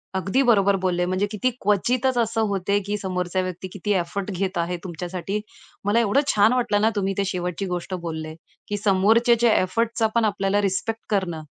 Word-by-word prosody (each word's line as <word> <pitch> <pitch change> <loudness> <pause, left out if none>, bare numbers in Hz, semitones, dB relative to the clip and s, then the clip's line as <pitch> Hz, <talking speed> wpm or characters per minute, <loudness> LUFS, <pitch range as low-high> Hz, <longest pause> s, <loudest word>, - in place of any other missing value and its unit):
अगदी 195 +7 +1
बरोबर 200 -5 +4
बोलले, 180 -1 +1
म्हणजे 185 +2 0
किती 220 +4 0
क्वचितच 245 +6 +1
असं 225 -1 +1
होते 200 0 0
की 205 +1 -2
समोरचा 185 -2 -2
व्यक्ती 185 0 -5
किती 200 +1 -3
एफर्ट 185 +3 -4
घेत 190 0 -2
आहे 170 +1 -1
तुमच्यासाठी. 180 +3 -4 0.5
मला 205 +3 +3
एवढं 230 +4 +3
छान 210 +3 +4
वाटलं 225 -5 +1
ना, 220 - +4
तुम्ही 195 -1 0
ते 200 - +1
शेवटची 180 0 -3
गोष्ट 180 0 -4
बोलले, 160 -1 -5 0.3
की 205 - -2
समोरच्याचा 220 +4 +3
एफर्टचा 225 +4 0
पण 230 -1 +3
आपल्याला 200 -1 +1
रिस्पेक्ट 205 +3 -1
करणं 185 -6 -1
200 Hz, 170 wpm, -23 LUFS, 185-220 Hz, 0.5 s, बरोबर